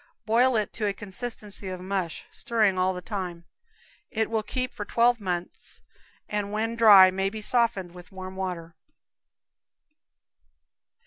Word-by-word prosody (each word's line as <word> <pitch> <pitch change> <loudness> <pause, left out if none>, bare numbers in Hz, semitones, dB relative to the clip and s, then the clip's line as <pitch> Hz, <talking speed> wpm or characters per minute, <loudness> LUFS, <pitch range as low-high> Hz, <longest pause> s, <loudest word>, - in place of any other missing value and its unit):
Boil 240 +3 +3
it 215 -2 -1
to 215 -3 -2
a 200 - 0
consistency 210 0 -6
of 185 -1 -5
mush, 185 -2 -3
stirring 215 -6 +1
all 185 +1 +2
the 180 -1 -6
time. 180 -5 -5 0.6
It 220 0 -1
will 220 -1 +1
keep 255 +3 -3
for 210 - -5
twelve 235 +2 +2
months, 180 -2 -5 0.4
and 205 -1 -2
when 225 +2 -1
dry 205 -5 +8
may 190 +1 0
be 220 +2 -7
softened 220 -5 0
with 180 +1 -13
warm 190 0 -8
water. 180 -3 -5
200 Hz, 140 wpm, -26 LUFS, 185-225 Hz, 0.6 s, dry